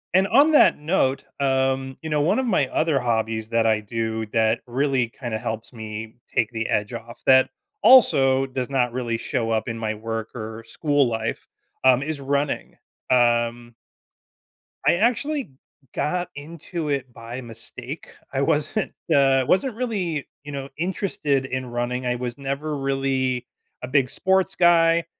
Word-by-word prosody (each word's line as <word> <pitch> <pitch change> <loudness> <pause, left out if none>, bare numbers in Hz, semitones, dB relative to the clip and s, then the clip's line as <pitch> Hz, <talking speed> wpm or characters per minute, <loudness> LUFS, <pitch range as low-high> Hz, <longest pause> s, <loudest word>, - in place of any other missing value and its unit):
And 190 +1 +4
on 280 +9 +5
that 300 - +6
note, 150 -4 +1 0.2
um, 135 -1 0
you 160 - -4
know, 150 -1 +1
1 160 +10 +2
of 260 - 0
my 180 - +2
other 155 0 +1
hobbies 110 -2 -1
that 115 -1 +2
I 110 -1 +3
do 110 +1 -3
that 110 +1 +1
really 130 -1 +1
kinda 120 -3 -5
helps 110 +2 -5
me 110 -1 -7
take 110 0 0
the 115 -1 -2
edge 105 +3 -1
off 115 0 -9
that 130 0 +6 0.3
also 135 - +6
does 130 -1 -4
not 125 -3 +1
really 120 -2 -2
show 115 -1 -2
up 110 0 0
in 115 -1 -3
my 110 -1 -2
work 115 +1 -4
or 110 -1 -6
school 145 +2 +1
life, 110 -1 -3 0.4
um, 130 0 +5
is 150 -1 -4
running. 140 +1 -2 0.3
Um 120 -1 +2 1.1
I - - +5
actually 250 - 0 0.4
got 180 +3 -1
into 160 +2 -6
it 135 -3 -2
by 115 +2 -7
mistake. 115 -2 -9 0.2
I - - 0
wasn't, - - 0 0.2
uh, 135 -2 +4
wasn't 245 +5 +2
really, 195 - -2 0.2
you 145 - -8
know, 135 -1 -5
interested 170 -5 -1
in 130 0 -3
running, 120 +1 -2
I 125 0 0
was 120 0 -4
never 140 +2 -3
really 135 -2 -1 0.4
a 125 - -3
big 130 -1 +2
sports 190 +3 +1
guy. 170 -1 +4
130 Hz, 155 wpm, -23 LUFS, 115-150 Hz, 1.1 s, that